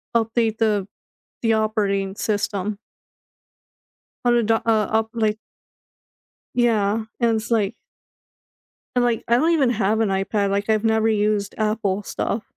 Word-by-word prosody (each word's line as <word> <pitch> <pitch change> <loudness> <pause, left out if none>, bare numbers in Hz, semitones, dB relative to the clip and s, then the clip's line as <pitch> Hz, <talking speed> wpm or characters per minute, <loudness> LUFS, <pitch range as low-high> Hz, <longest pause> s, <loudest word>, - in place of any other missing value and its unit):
update 225 -1 +1
the 210 -3 +1 0.6
the 225 -1 +3
operating 205 -3 0
system. 205 -1 -2 1.5
How 240 - +4
to 240 -1 +3
the 225 +1 +2
uh, - - -3 0.3
up, 220 0 +1
like 215 -1 0 1.2
Yeah, 220 -3 +2 0.2
and 230 -1 +3
it's, 220 +2 -5
like 215 -4 +1 1.2
and, 245 - +3
like, 235 -2 0
I 235 - +4
don't 315 +7 +2
even 295 -7 +3
have 220 -1 +1
an 220 - +2
iPad, 195 +1 0
like 200 +2 -1
I've 215 0 +2
never 220 0 +2
used 210 -1 0
Apple 210 -2 0
stuff. 210 +2 -3
220 Hz, 140 wpm, -22 LUFS, 205-225 Hz, 1.5 s, How